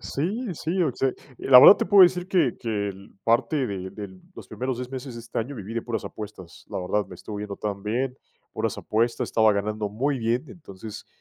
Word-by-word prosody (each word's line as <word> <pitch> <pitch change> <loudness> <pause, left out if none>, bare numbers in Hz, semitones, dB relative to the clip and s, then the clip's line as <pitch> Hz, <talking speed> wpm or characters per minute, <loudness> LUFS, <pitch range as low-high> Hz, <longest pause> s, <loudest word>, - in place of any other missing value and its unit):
Sí, 200 - -3
sí, 175 +4 -1
o 155 - +2
se 135 +1 0 0.2
la 125 -2 +8
verdad, 200 - +10
te - - -2
puedo 200 -2 +8
decir 180 0 +4
que 170 -10 +2
que 105 -3 -2
l 100 0 -10
parte 125 +5 +2
de 95 -2 -5
del 95 -3 -9
los - - -11
primeros 130 -1 -3
10 125 0 -6
meses 130 -1 -6
de 115 - -7
este 115 0 -5
año 125 +6 -3
viví 110 -1 -7
de 115 - -2
puras 115 -2 -4
apuestas, 100 -5 -9
la - - -4
verdad, 100 +3 -1
me - - -11
estuvo 105 +4 -8
yendo 105 -1 -5
tan 100 -1 -4
bien, 125 +4 -1 0.4
puras - - -2
apuestas, 115 +2 0
estaba 110 -1 +4
ganando 105 +1 -2
muy 130 +7 -1
bien. 120 +4 0
Entonces, 105 - -10
115 Hz, 215 wpm, -25 LUFS, 105-135 Hz, 0.4 s, verdad